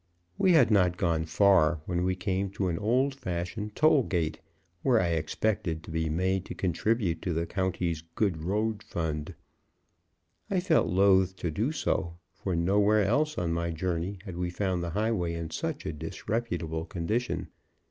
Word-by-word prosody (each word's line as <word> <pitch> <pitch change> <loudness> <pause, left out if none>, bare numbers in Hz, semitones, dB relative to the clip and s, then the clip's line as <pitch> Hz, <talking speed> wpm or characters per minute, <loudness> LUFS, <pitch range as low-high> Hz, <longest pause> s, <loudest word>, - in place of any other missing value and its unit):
We 185 - +5
had 155 -7 +5
not 90 -4 +3
gone 85 -5 +1
far, 85 -2 +4
when 90 -1 -1
we 95 0 +1
came 95 +1 -1
to 95 -2 -1
an 85 - -2
old 125 +6 +2
fashioned 105 -1 -4
toll 155 -2 +5
gate, 85 -9 -1 0.4
where 125 -4 +4
I 90 - +1
expected 85 +1 -1
to - - -9
be 80 0 -1
made 95 +4 0
to - - -7
contribute 95 -1 0
to 90 - -2
the 85 +1 -1
county's 90 -4 -1
good 95 -7 0
road 105 +5 -1
fund. 75 -3 -4 1.1
I 190 - +1
felt 175 -3 +3
loath 95 0 +4
to 85 -3 -3
do 110 - 0
so, 85 - -1 0.2
for 95 -3 -3
nowhere 100 +5 +3
else 150 +9 +1
on 85 -2 0
my 85 0 -1
journey 85 +3 -2
had 90 -4 -7
we 90 0 -1
found 90 -1 -1
the 85 - -3
highway 95 -3 0
in 85 -1 -5
such - - -3
a 80 - -2
disreputable 80 0 -3
condition. 105 +8 -2
90 Hz, 170 wpm, -29 LUFS, 85-105 Hz, 1.1 s, We